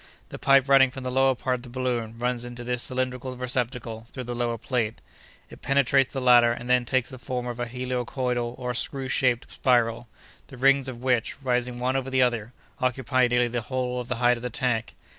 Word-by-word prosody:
"The - - -8
pipe 135 -1 +4
running 135 -1 +6
from 130 0 -8
the 130 - -3
lower 135 0 +3
part 125 +1 -1
of - - -12
the 125 - -12
balloon 120 -3 -3
runs 120 0 -1
into 120 0 -8
this 125 0 -1
cylindrical 130 0 -1
receptacle 120 -2 -3
through 130 - -6
the 120 0 -5
lower 120 -1 -1
plate; 115 -2 -2 0.5
it - - -13
penetrates 135 0 +2
the 135 - -3
latter 120 -2 +6
and 120 +1 -5
then 125 -1 +3
takes 130 +1 0
the 130 - -9
form 125 0 -4
of 120 0 -5
a 120 - -2
helicoidal 125 0 -2
or 125 -1 -3
screw 135 +2 -1
shaped 125 -1 0
spiral, 120 -2 +1 0.4
the 135 - -12
rings 135 +1 +4
of 125 -1 -7
which, 125 -1 0
rising 125 -1 0
one 125 +2 -1
over 135 0 -1
the 130 -1 +3
other, 120 -2 -1 0.3
occupy 130 0 +1
nearly 120 0 +2
the 120 0 -2
whole 125 +1 -2
of 125 - -6
the 125 - -2
height 120 +1 +3
of - - -10
the 125 - -3
tank. 120 -1 -1
125 Hz, 215 wpm, -26 LUFS, 120-130 Hz, 0.5 s, running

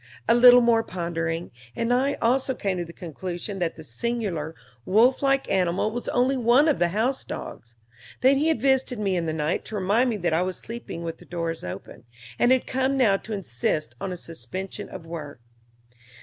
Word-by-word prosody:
A 230 - +6
little 245 +1 +8
more 235 -1 +4
pondering, 170 -3 -3 0.2
and 230 +1 0
I 270 +3 +2
also 260 +2 +2
came 190 -3 -2
to 175 - -2
the 170 - -10
conclusion 175 +4 -6
that 170 -2 -1
the 160 - -10
singular 165 - -3 0.3
wolf 225 - +4
like 275 -1 +2
animal 185 +2 +1
was 240 +2 -4
only 255 +2 +2
one 250 +4 +4
of 300 - +2
the 175 - +3
house 225 +9 0
dogs; 115 +1 -8 0.5
that 265 +2 +5
he 295 +3 +1
had 320 - +2
visited 265 -2 +2
me 200 -3 0
in 170 -2 -1
the - - 0
night 155 +1 -1
to 220 - -6
remind 210 +6 +2
me 225 - -1
that 175 -4 0
I 165 - +2
was 185 0 -2
sleeping 230 -7 -7
with 165 -1 -5
the - - -15
door 165 -1 -2
open, 90 +5 -8 0.3
and 240 - +4
had 260 -1 +3
come 265 +1 0
now 225 -7 +4
to 220 - -7
insist 130 - -2
on 190 - -3
a 180 - -4
suspension 170 +4 -6
of 165 - -9
work. 155 -5 -7
195 Hz, 200 wpm, -25 LUFS, 170-245 Hz, 0.5 s, little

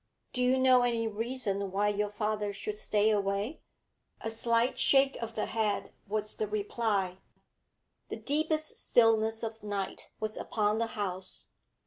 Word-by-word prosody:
'Do 250 - -1
you 250 +1 +4
know 260 -1 +6
any 235 -2 +1
reason 215 -3 -1
why 200 +2 +1
your 210 0 0
father 210 0 -1
should 200 +1 -4
stay 210 0 +2
away?' 200 +6 -1 0.6
A 225 - -3
slight 230 +2 +1
shake 270 0 +5
of 230 -1 -5
the 215 - 0
head 215 -2 -1
was 215 +1 -1
the 215 - -1
reply. 205 -3 -1 0.9
The - - -3
deepest 310 +1 0
stillness 225 -1 +3
of 225 0 -4
night 200 -2 -4
was 215 0 -3
upon 210 0 0
the 230 - +1
house. 185 -2 -4
215 Hz, 145 wpm, -31 LUFS, 205-235 Hz, 0.9 s, know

